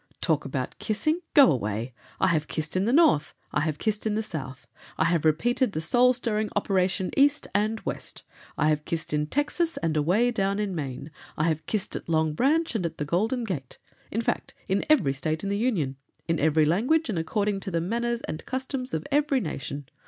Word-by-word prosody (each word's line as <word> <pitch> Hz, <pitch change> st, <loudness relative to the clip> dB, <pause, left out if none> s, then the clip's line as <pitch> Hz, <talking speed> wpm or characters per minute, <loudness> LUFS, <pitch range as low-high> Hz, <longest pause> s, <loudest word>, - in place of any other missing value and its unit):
"Talk -, -, +1 dB
about -, -, -4 dB
kissing! 310 Hz, +10 st, 0 dB, 0.2 s
Go 280 Hz, -, +8 dB
away! 115 Hz, 0 st, -2 dB, 0.3 s
I -, -, +3 dB
have 155 Hz, -3 st, +1 dB
kissed 155 Hz, +2 st, -3 dB
in 185 Hz, +1 st, +2 dB
the 235 Hz, -, +2 dB
North, 275 Hz, -, +4 dB, 0.2 s
I -, -, +1 dB
have 155 Hz, -1 st, -1 dB
kissed 215 Hz, +5 st, -1 dB
in 210 Hz, -, 0 dB
the 220 Hz, -, 0 dB
South; 135 Hz, -, -6 dB, 0.3 s
I -, -, +3 dB
have 165 Hz, -2 st, +1 dB
repeated 240 Hz, -, +2 dB
the -, -, -1 dB
soul 245 Hz, +10 st, +4 dB
stirring 220 Hz, -3 st, -1 dB
operation 190 Hz, -2 st, +1 dB
East 285 Hz, +1 st, +4 dB
and 215 Hz, +2 st, +1 dB
West; -, -, -5 dB, 0.3 s
I 155 Hz, 0 st, +3 dB
have 150 Hz, -1 st, +1 dB
kissed 165 Hz, -1 st, -3 dB
in 150 Hz, 0 st, +1 dB
Texas 310 Hz, -, 0 dB
and 165 Hz, -1 st, -1 dB
away 185 Hz, +11 st, +3 dB
down 200 Hz, -3 st, 0 dB
in 205 Hz, -2 st, -1 dB
Maine; 140 Hz, -2 st, -5 dB, 0.3 s
I 155 Hz, -, +1 dB
have 160 Hz, -1 st, 0 dB
kissed 210 Hz, -3 st, -2 dB
at -, -, -6 dB
Long 160 Hz, -1 st, +2 dB
Branch 300 Hz, -, +2 dB
and 220 Hz, -5 st, -1 dB
at 165 Hz, -1 st, -3 dB
the 150 Hz, -, -2 dB
Golden 220 Hz, -, 0 dB
Gate— 150 Hz, -, -5 dB, 0.3 s
in 225 Hz, +3 st, -2 dB
fact, -, -, -2 dB
in 195 Hz, +1 st, +1 dB
every 205 Hz, -, +4 dB
State 155 Hz, +3 st, -2 dB
in 200 Hz, -, -2 dB
the -, -, +1 dB
Union; 170 Hz, -, 0 dB, 0.3 s
in 165 Hz, -2 st, +1 dB
every 155 Hz, 0 st, +3 dB
language 250 Hz, -, +2 dB
and 205 Hz, -8 st, -1 dB
according 200 Hz, +4 st, 0 dB
to 195 Hz, -, -4 dB
the 170 Hz, -2 st, 0 dB
manners 235 Hz, +6 st, -1 dB
and 155 Hz, -, -6 dB
customs 260 Hz, 0 st, -3 dB
of -, -, -3 dB
every 290 Hz, -1 st, +3 dB
nation. 145 Hz, -, -5 dB
190 Hz, 205 wpm, -26 LUFS, 155-240 Hz, 0.3 s, Go